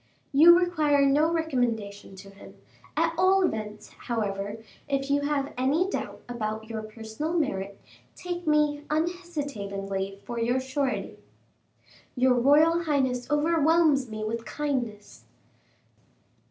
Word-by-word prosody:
"You 335 +5 +8
require 305 -6 +2
no 295 +4 +3
recommendation 240 - -2
to 195 +1 -12
him. 200 - -14 0.4
At 330 +1 +2
all 380 +1 +4
events, 215 -7 -4
however, 205 -3 -4 0.3
if 275 0 -1
you 285 0 +2
have 285 -1 -1
any 295 +8 +2
doubt - - -4
about 220 -2 -4
your 220 -1 -3
personal 220 +8 -5
merit, 200 - -2 0.4
take 350 -1 -6
me 300 -1 +2
unhesitatingly 280 - -3
for 240 -1 -4
your 240 +3 +1
surety." 265 0 -3 1.0
"Your 255 0 +4
royal 305 +7 +4
highness 260 -5 0
overwhelms 305 -2 +3
me 215 0 -5
with 225 +1 -3
kindness." 235 -5 -4
275 Hz, 115 wpm, -27 LUFS, 220-310 Hz, 1.0 s, You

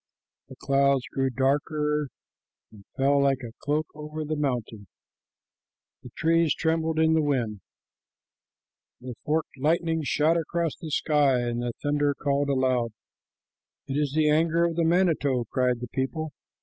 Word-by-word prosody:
The 130 - -10
clouds 140 -1 +2
grew 135 0 +1
darker 150 +3 0 0.6
and 105 -3 -15
fell 140 +1 +3
like 135 -1 +1
a 115 - -6
cloak 150 +2 0
over 150 +1 -6
the 155 +1 -2
mountain, 120 -8 -3 1.1
the - - -11
trees 165 -1 +2
trembled 160 0 0
in 160 0 +4
the 160 - +3
wind, 120 -9 -1 1.4
the 125 0 -7
forked 155 -2 -2
lightning 160 +2 +1
shot 155 +3 +2
across 165 0 -1
the 165 - -8
sky, 145 -4 +2
and 120 0 -2
the 120 -1 -3
thunder 145 -1 +1
called 140 0 0
aloud. 130 -4 +1 0.9
"It 135 - -5
is 145 -2 0
the 155 -1 +3
anger 165 +2 +3
of 170 -1 -1
the 170 0 +1
manito," 160 -7 +2
cried 125 -2 +1
the 125 - -4
people. 155 +4 -2
145 Hz, 145 wpm, -26 LUFS, 130-160 Hz, 1.4 s, in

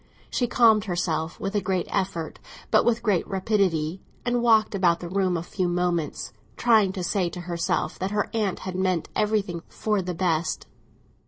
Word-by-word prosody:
She 245 - +1
calmed 225 -3 +4
herself 170 -3 -2
with 195 - -3
a 205 - +1
great 185 -3 0
effort, 185 -4 -2 0.3
but - - +5
with 235 -1 +1
great 205 -6 +1
rapidity, 190 -4 0 0.2
and 245 0 +1
walked 220 -3 +4
about 175 -4 +3
the 175 - -6
room 185 -1 +1
a 165 - -4
few 180 +1 -2
moments, 175 -3 -1 0.2
trying 220 -5 +4
to 185 - -4
say 180 0 0
to 180 - -7
herself 170 -1 -2
that 190 - -1
her 210 0 0
aunt 210 -4 -1
had 185 - -5
meant 185 -3 0
everything 205 -5 0
for 210 -2 -1
the 180 -1 -4
best. 165 -2 0
185 Hz, 175 wpm, -25 LUFS, 175-210 Hz, 0.3 s, but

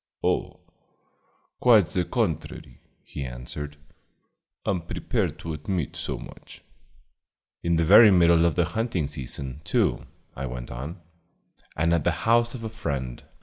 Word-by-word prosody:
"Oh, - - -1 1.0
quite 115 -6 +6
the 90 +3 -1
contrary," 80 - -3 0.2
he 70 - -6
answered. 65 +4 -6 0.9
"I'm 95 -3 0
prepared 85 - -2
to 80 - -5
admit 80 +1 -3
so - - -4
much." - - -12 1.0
"In 85 0 +1
the 80 0 +2
very 105 +5 +9
middle 85 -3 +5
of 85 - +2
the 85 - +3
hunting 110 -2 -1
season, 70 0 -6
too," - - +1 0.3
I 65 +1 -4
went 60 0 -7
on, 70 +8 -6 0.8
"and 85 +2 +2
at 85 - +2
the 90 +4 -1
house 115 +1 +3
of 115 - -7
a 110 - -3
friend. 70 - -4
85 Hz, 140 wpm, -26 LUFS, 70-95 Hz, 1.0 s, very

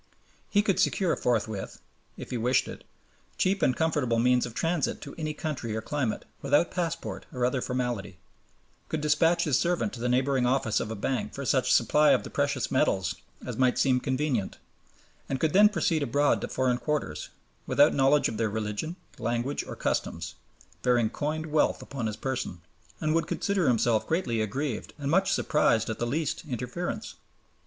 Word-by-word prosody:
He 205 0 +3
could 195 -3 +1
secure 185 -4 +2
forthwith, 110 -4 -2 0.4
if - - -8
he - - -2
wished 125 +3 +2
it, - - -8 0.5
cheap 195 +2 +1
and 125 - +3
comfortable 150 -8 +1
means 125 +1 +3
of 120 - -11
transit 165 0 0
to 140 - -8
any 155 -2 -3
country 130 -9 -3
or 110 - -2
climate 135 -6 -2 0.2
without 145 +4 +2
passport 170 -2 -3
or 125 -4 0
other 125 +1 0
formality, 120 -8 -3 0.7
could 160 - -1
despatch 165 +3 +3
his 145 -5 +2
servant 175 +4 0
to - - -7
the 125 +1 -1
neighboring 130 0 +2
office 125 -4 +1
of - - -3
a 110 - -4
bank 125 +5 -2
for 140 - -5
such 130 -1 +2
supply 150 +6 +5
of - - +1
the - - -8
precious - - 0
metals 95 -2 +1 0.3
as - - -5
might 130 -1 +3
seem 125 0 +3
convenient, 130 -5 -1 0.7
and 135 - -1
could 155 +1 +1
then 210 +2 +7
proceed 165 -6 0
abroad 145 +2 +2
to - - -3
foreign 125 -1 0
quarters, 140 - -2 0.4
without 145 +2 +5
knowledge 140 +2 +4
of 110 - -4
their 110 -1 +1
religion, 110 +9 -3 0.2
language, 120 +4 -1
or - - -7
customs, - - -2 0.5
bearing 120 -3 +2
coined 155 +2 -2
wealth 155 -1 +1
upon 130 -5 -4
his 110 - -4
person, 130 -10 -3 0.4
and 155 0 0
would 165 0 +1
consider 200 -5 0
himself 115 -2 +2
greatly 130 -10 0
aggrieved 130 +4 -3
and 145 -1 -2
much 190 +3 +3
surprised 115 -6 +2
at 110 - -6
the 120 - -1
least 150 +4 -2
interference. 130 - -4
130 Hz, 175 wpm, -28 LUFS, 120-155 Hz, 0.7 s, then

